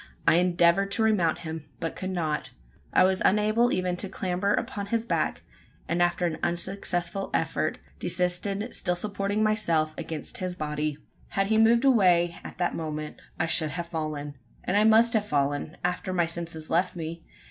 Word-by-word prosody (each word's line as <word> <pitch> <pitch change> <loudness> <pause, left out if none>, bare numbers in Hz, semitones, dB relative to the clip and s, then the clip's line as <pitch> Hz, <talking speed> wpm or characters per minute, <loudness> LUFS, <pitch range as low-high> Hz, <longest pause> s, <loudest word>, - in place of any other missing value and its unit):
I 165 - +6
endeavoured 175 +2 +3
to 225 - +1
remount 185 -8 +2
him, 160 -1 -6
but 165 - -3
could 185 - -4
not. 160 -5 -2 0.4
I - - +5
was 190 0 +2
unable 215 +4 +3
even 180 -1 0
to 195 - -3
clamber 185 +1 -1
upon 200 -1 -2
his 230 +2 -1
back; - - -1 0.4
and 170 +1 0
after 175 +1 +2
an 160 -2 -2
unsuccessful 175 +1 -1
effort, - - 0 0.2
desisted 195 +5 -1
still 180 - 0
supporting 200 +2 -1
myself 170 -8 +1
against 160 -3 -4
his 185 -1 -3
body. 150 -2 -2 0.3
Had 195 - 0
he 220 - +4
moved 230 +3 +5
away, 180 -9 +4
at - - -9
the 175 -1 +1
moment, 155 -1 -5 0.2
I 160 - +2
should 160 -1 +1
have 170 +3 -5
fallen. 150 -4 -4 0.2
And 185 - -1
I 210 +1 +5
must 225 +1 +5
have 210 -2 +1
fallen 145 +1 -1
after 180 +1 -1
my 175 -2 +2
senses 165 -1 -4
left 180 +3 +1
me. 165 0 -6
180 Hz, 170 wpm, -27 LUFS, 160-200 Hz, 0.4 s, I